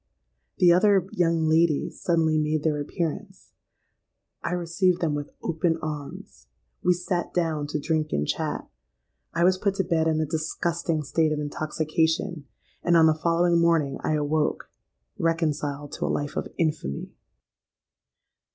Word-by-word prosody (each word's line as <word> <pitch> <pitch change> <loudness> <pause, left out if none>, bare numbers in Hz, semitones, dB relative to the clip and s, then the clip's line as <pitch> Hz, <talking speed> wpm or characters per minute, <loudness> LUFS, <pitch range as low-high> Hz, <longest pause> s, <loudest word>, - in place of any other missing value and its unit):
The 175 -1 +6
other 190 0 +4
young 165 -2 +1
ladies 160 -1 +2
suddenly 160 -2 +2
made 150 0 0
their 150 -2 +1
appearance: 185 +5 -5 0.9
I 170 - -2
received 180 +1 +1
them 165 -4 0
with 145 0 -4
open 165 0 0
arms;—we 140 - -5
sate 175 0 -3
down 160 -4 0
to 150 +1 -2
drink 155 +1 0
and 75 +1 0
chat;—I - - -5
was 185 +1 +4
put 200 -1 0
to 195 - +1
bed 165 -2 +1
in 160 -1 +1
a 155 - +1
disgusting 160 +1 -2
state 155 +2 +1
of 155 - 0
intoxication; 155 +2 -1 0.4
and 170 -1 +4
on 165 - +6
the 160 - +5
following 170 +2 +2
morning 165 -5 +2
I - - +1
awoke—reconciled 150 0 -2
to - - -3
a - - -1
life 145 0 -2
of - - -2
infamy! 155 - -2
160 Hz, 135 wpm, -25 LUFS, 150-170 Hz, 0.9 s, The